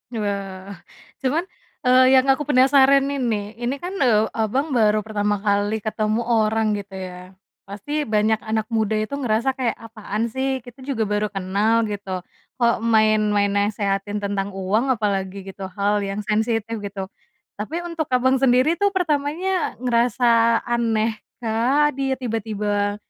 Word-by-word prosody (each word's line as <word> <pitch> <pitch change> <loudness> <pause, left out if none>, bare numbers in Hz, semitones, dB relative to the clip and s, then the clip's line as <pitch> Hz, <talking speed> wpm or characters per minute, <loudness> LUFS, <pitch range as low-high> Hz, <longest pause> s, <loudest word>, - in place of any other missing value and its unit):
Wah, 200 -2 -4 0.5
cuman, 285 +6 0 0.4
eee, 255 +1 +5
yang 260 0 +5
aku 295 +2 -1
penasaran 270 0 +5
ini, 220 -7 -2
ini 245 +3 -1
kan, 355 +6 -6
eee, 220 -5 +3
Abang 260 +8 -1
baru 215 -3 +3
pertama 210 -1 -1
kali 205 +1 0
ketemu 215 +1 -1
orang 220 -2 +1
gitu 195 -1 -10
ya, 185 0 -8 0.3
pasti 290 +9 -4
banyak 215 0 +2
anak 220 +1 -3
muda 220 -1 +1
itu 215 +7 -2
ngerasa 240 +1 +1
kayak, 255 -3 -2
"Apaan 225 0 -4
sih? 265 -1 -2
Kita 245 +2 -14
juga 260 -4 -2
baru 210 0 0
kenal 205 +3 +1
gitu 190 -3 -5 0.3
kok 235 -2 +2
main 215 -2 +3 0.2
main 200 0 +2
nasehatin 205 0 -1
tentang 200 0 -2
uang 210 +7 0
apalagi 195 -2 -2
gitu 190 0 -7
hal 205 +1 +1
yang 200 +1 -3
sensitif." 220 +1 -1
Gitu, 200 -1 -5 0.6
tapi 325 +11 -4
untuk 335 -3 -3
Abang 260 +1 +2
sendiri 265 +6 +3
tuh 405 -1 +1
pertamanya 335 - 0
ngerasa 235 -1 +3
aneh 225 -2 0 0.2
kah, 255 +7 +2
dia 270 0 -1
tiba-tiba 210 -4 -2
220 Hz, 145 wpm, -22 LUFS, 205-260 Hz, 0.6 s, eee